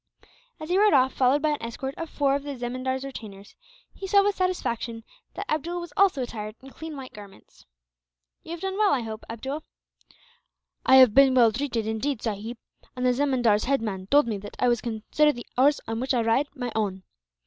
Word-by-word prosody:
As 310 +1 -8
he 365 +2 +3
rode 420 -3 +5
off, 260 0 +3
followed 270 +3 +2
by 310 - +3
an 295 - -3
escort 250 +4 -5
of 330 -1 -6
four 280 -2 +1
of 280 - -2
the 285 -1 -6
zemindar's 255 +2 -3
retainers, 205 -7 -9 0.4
he 390 - -7
saw 400 +1 +5
with 410 0 +1
satisfaction 235 -11 -2 0.3
that 400 - -5
Abdool 335 +3 -2
was 345 -3 -8
also 375 -9 +3
attired 215 -3 -6
in 270 +1 -14
clean 315 0 -8
white 265 -1 -9
garments. 200 -2 -15 0.7
"You - - -15
have 340 0 -6
done 385 +1 -3
well, 420 -2 +4
I 255 - -2
hope, 220 -1 -7
Abdool?" 265 +7 -5 1.3
"I 265 - +7
have 255 -5 +8
been 270 0 +6
well 235 -3 +6
treated, 240 -2 -2
indeed, 220 +4 -2
sahib, 225 +2 -4 0.4
and 250 0 -2
the 250 - +4
zemindar's 245 -6 +2
head 270 -2 +1
man 190 -4 -4
told 290 +6 +5
me 210 -3 -2
that 205 +1 -10
I 250 - +2
was 240 -1 +2
to 240 - -4
consider 230 +7 +2
the 240 - -9
horse 280 +3 +4
on 225 0 -3
which 260 +1 0
I 240 - +2
ride 230 +6 +2
my 245 -3 -4
own. 195 -4 -2
260 Hz, 210 wpm, -26 LUFS, 225-290 Hz, 1.3 s, have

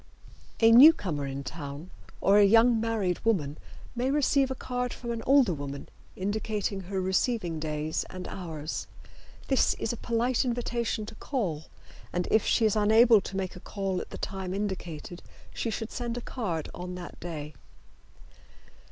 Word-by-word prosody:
A 225 0 +7
newcomer 205 - +6
in 135 0 -5
town 145 +3 -7 0.3
or 200 +1 +5
a - - +7
young 225 +3 +5
married 215 -6 -1
woman 155 -10 0 0.4
may 245 +2 0
receive 280 -1 +2
a 265 - -3
card 250 -1 -3
from 235 -1 -6
an 230 -1 -3
older 270 -8 +5
woman 140 -2 -6 0.3
indicating 205 0 -2
her 190 +1 -4
receiving 185 -2 0
days 155 0 -2
and 185 0 -7
hours. 160 -4 -5 0.6
This 270 - +3
is 225 - -2
a - - -6
polite 235 +3 0
invitation 235 -3 -2
to - - -9
call, 175 - -3 0.5
and 180 0 -1
if 220 - +4
she 230 - +3
is 215 - +2
unable 220 +1 +6
to 195 - -6
make 190 0 -3
a - - -9
call 195 -1 -3
at - - -9
the - - -8
time 190 -2 -4
indicated 180 -4 -5 0.3
she 230 - -2
should 225 +1 -4
send 240 -1 -3
a - - -4
card 180 - -3
on 180 0 -6
that 180 -1 -9
day. 155 -3 -6
200 Hz, 160 wpm, -28 LUFS, 175-235 Hz, 0.6 s, A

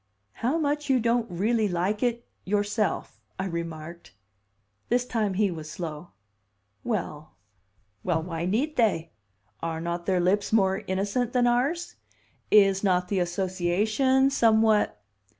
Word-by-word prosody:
"How 255 +8 +1
much 295 -2 -1
you 260 -2 +4
don't 235 0 +1
'really 215 +5 +1
like 185 +4 -1
it' 240 -1 -1 0.2
yourself!" 205 +1 -1 0.2
I 190 - -2
remarked. 170 - -6 0.8
This 245 +1 +2
time 215 -6 -1
he 200 -1 +2
was 155 -2 -7
slow. 160 0 -6 0.7
"Well 155 - -4 0.7
well 165 -3 0
why 165 -1 -4
need 275 +11 -1
they? 185 -9 +1 0.5
Are 165 -1 -3
not 170 +1 -4
their 185 -2 +2
lips 190 +3 +1
more 195 -2 +2
innocent 205 +6 -1
than 250 -1 +3
ours? 270 +8 0 0.5
Is 195 -2 +5
not 180 -2 +1
the 200 - +1
association 195 +9 +1
somewhat 220 - +3
200 Hz, 130 wpm, -26 LUFS, 175-235 Hz, 0.8 s, Is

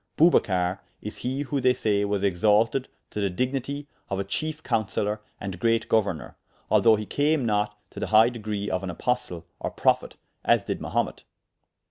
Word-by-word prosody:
Bubacar 95 - +3 0.2
is 105 - -6
he 130 +3 -2
who 140 -1 -2
they 125 0 +4
say 100 -2 +1
was 100 -1 -1
exalted 105 +7 +3 0.2
to 105 - -3
the 100 - +1
dignitie 135 +7 -2 0.2
of 95 - -1
a 100 - -1
chiefe 155 +10 -3
counseller 105 -1 0 0.2
and 95 -3 -5
great 115 +1 +2
gouernour, 100 -8 0 0.4
although 115 -1 +6
he 105 0 -4
came 145 +2 +1
not 105 -1 0
to - - -8
the - - -2
high 110 +2 +6
degree 105 -4 -4
of 95 -2 -1
an 95 - -4
apostle, 90 -3 -2
or - - -2
prophet, - - +1 0.3
as - - +3
dyd - - -2
Mahumet. - - -2
110 Hz, 170 wpm, -26 LUFS, 100-125 Hz, 0.4 s, although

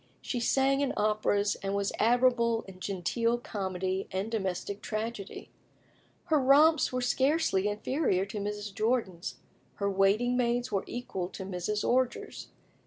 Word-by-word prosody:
She 245 - -3
sang 270 +3 +2
in 280 - 0
operas, 210 -1 +1
and 195 0 -2
was 200 0 0
admirable 235 -1 +3
in 190 -1 -13
genteel 205 +6 0
comedy 190 -4 -3
and 195 +4 -3
domestic 200 -1 -3
tragedy. 215 -2 -5 0.7
Her 315 -4 +3
romps 295 +4 +5
were 255 0 -1
scarcely 260 - +2
inferior 210 - 0
to 205 +1 -6
Mrs. 205 0 -4
Jordan's; 215 -5 -1 0.4
her 200 0 -1
waiting 200 +6 +2
maids 245 0 0
were 195 - 0
equal 190 -7 -4
to 190 - -7
Mrs. 195 +3 -2
Orger's. 255 0 -1
215 Hz, 135 wpm, -29 LUFS, 195-245 Hz, 0.7 s, romps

